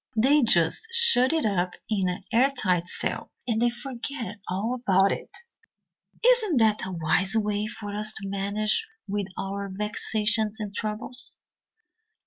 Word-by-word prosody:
They 270 +7 +4
just 220 - +3
shut 470 - +4
it 320 -4 0
up 180 -4 0
in 195 -4 0
an 180 - -4
airtight 225 -9 +2
cell, - - -1 0.2
and 225 -2 0
then 240 - +4
forget 240 -2 -5
all 200 +7 -1
about 195 -6 +2
it. - - -4 1.0
Isn't 460 - +4
that 215 -3 +2
a - - -5
wise 175 +4 +1
way 210 -1 0
for 210 -2 -7
us 210 +1 +2
to 195 - -6
manage 200 +2 -1 0.2
with 200 -1 -2
our 200 +1 -4
vexations 215 +2 0
and 205 -2 -5
troubles? 215 +5 -5
215 Hz, 140 wpm, -26 LUFS, 195-240 Hz, 1.0 s, They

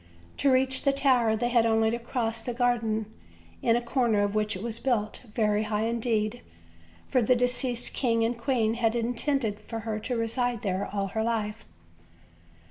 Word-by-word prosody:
To 280 - +3
reach 260 0 +3
the 275 - +2
tower 250 -5 +3
they 240 +2 -1
had 240 -2 +4
only 225 0 +2
to 235 - -2
cross 230 -1 -2
the 240 +1 -4
garden, 230 -3 +1 0.6
in 230 - +3
a 240 - +1
corner 235 -4 +1
of 205 0 -1
which 215 -1 0
it 185 - -6
was 230 -1 -1
built, 220 -5 -1
very 210 -2 +2
high 210 0 -1
indeed, 230 0 -1 0.6
for 255 - +1
the 250 +3 +3
deceased 245 0 +1
king 230 -3 +1
and 235 +2 0
queen 235 -2 0
had 230 -1 0
intended 235 -1 -1
her 225 -2 -3
to 245 +3 -3
reside 235 0 -1
there 190 -1 -1
all 200 -1 -2
her 220 +3 -2
life. 220 -1 -2
230 Hz, 175 wpm, -27 LUFS, 220-245 Hz, 0.6 s, had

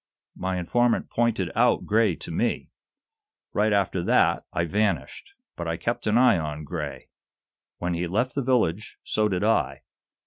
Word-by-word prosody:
"My 95 0 -2
informant 120 +7 +1
pointed 115 -6 0
out 120 +2 +2
Gray 105 -4 +2
to - - -9
me. - - -1 0.8
Right 105 +1 +2
after 100 -3 +1
that, - - +2
I 85 - 0
vanished. 95 -6 -2 0.2
But - - -5
I - - -2
kept - - -3
an 105 +2 +3
eye 125 -7 +5
on 75 -1 -4
Gray. 75 -2 -6 0.7
When 90 0 -2
he 85 +1 -2
left 120 +8 0
the 140 - -1
village, 110 -7 0
so 105 0 +1
did 95 0 -1
I. 70 -11 +1
100 Hz, 160 wpm, -25 LUFS, 85-115 Hz, 0.8 s, eye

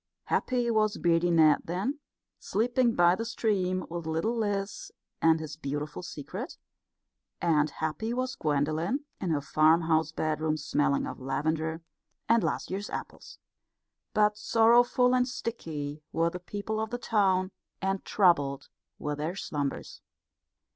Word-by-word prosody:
Happy 245 -2 0
was 215 -1 +2
Beardy 170 0 +2
Ned 155 -3 +5
then, 195 - -2 0.4
sleeping 240 +2 +1
by 175 0 +5
the 225 - -2
stream, 195 -5 0
with 170 -1 -5
little 165 +9 0
Liz 205 -3 -2 0.3
and 160 0 +5
his 155 -2 -6
beautiful 145 +1 -4
secret; 150 -5 -7 0.8
and 155 -3 +2
happy 160 +10 -3
was 255 +1 -1
Gwendolen 155 - -1
in 185 - -2
her 150 -3 +1
farmhouse 160 +1 +3
bedroom 155 0 -1
smelling 145 -2 +1
of - - -6
lavender 160 +5 -2 0.4
and 230 -1 +4
last - - -2
year's 200 +2 -3
apples. - - -7 0.7
But 210 0 +2
sorrowful 240 +3 +4
and 250 0 +3
sticky 155 - -5
were 165 +1 +1
the 180 - -6
people 205 +4 -4
of 220 - -2
the 245 - -3
town, 190 -5 +1 0.3
and 195 0 -1
troubled 145 -8 +2 0.3
were 150 - -3
their 155 +5 -3
slumbers. 145 -7 -4
175 Hz, 135 wpm, -29 LUFS, 155-220 Hz, 0.8 s, Ned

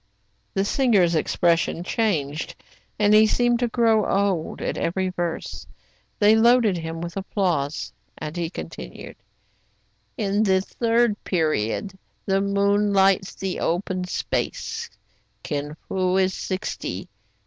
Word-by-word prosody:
The 195 0 +1
singer's 205 -8 +3
expression 170 +1 +1
changed, 165 -8 -1 0.4
and 210 0 +4
he 215 +1 +7
seemed 240 +1 +2
to 245 - +1
grow 225 -2 +3
old, 195 -5 0
at - - -2
every 185 +2 -1
verse. 175 -2 -4 0.5
They 210 +1 +5
loaded 230 -2 +5
him 165 0 -5
with 170 -1 -6
applause. 175 -7 -1 0.4
He 170 -1 -2
continued, - - -8 0.6
— - - -42 0.3
<*In 205 -1 +1
the 190 -3 +3
third 230 +1 +1
period 165 - -1 0.3
the 195 0 +2
moon 200 +1 +2
lights 195 -1 +3
the 190 -1 -3
open 180 +1 -1
space, 450 - -3 0.5
Kin 145 0 -3
Fo 185 0 +1
is 190 0 +2
sixty. 190 +4 -4
195 Hz, 120 wpm, -24 LUFS, 175-215 Hz, 0.6 s, he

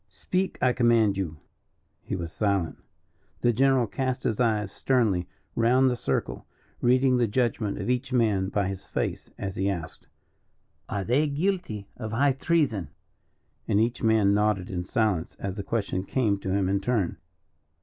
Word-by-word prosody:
"Speak, 185 +1 -2
I 125 -1 +4
command 115 -5 +3
you." 85 -5 -3 0.6
He - - -4
was 85 -3 -5
silent. 100 -6 0 0.6
The 120 - +3
general 135 +1 +3
cast 130 +4 -2
his 110 - -1
eyes 105 -4 +1
sternly 105 -9 +1 0.3
round 125 +3 +4
the - - 0
circle, 120 - -2 0.3
reading 130 +1 +4
the 120 -2 +2
judgment 110 -2 0
of - - -4
each 125 +2 -1
man 105 -6 +2
by 100 -2 0
his 95 0 -5
face, - - -3
as 95 -1 -5
he 95 +1 +1
asked: 85 -5 -5 0.8
"Are 100 -1 -2
they 135 +9 +2
guilty 145 - -2
of 110 -2 -5
high 135 +4 +3
treason?" 135 - 0 0.8
And 100 - +2
each 115 +2 0
man 110 -3 +4
nodded 105 -3 +1
in 90 -1 -3
silence 105 -6 0
as 100 0 -4
the - - -2
question 100 -4 -2
came 105 -2 0
to 95 - -5
him 95 0 +1
in 100 +1 +1
turn. 105 -4 0
110 Hz, 160 wpm, -27 LUFS, 100-125 Hz, 0.8 s, I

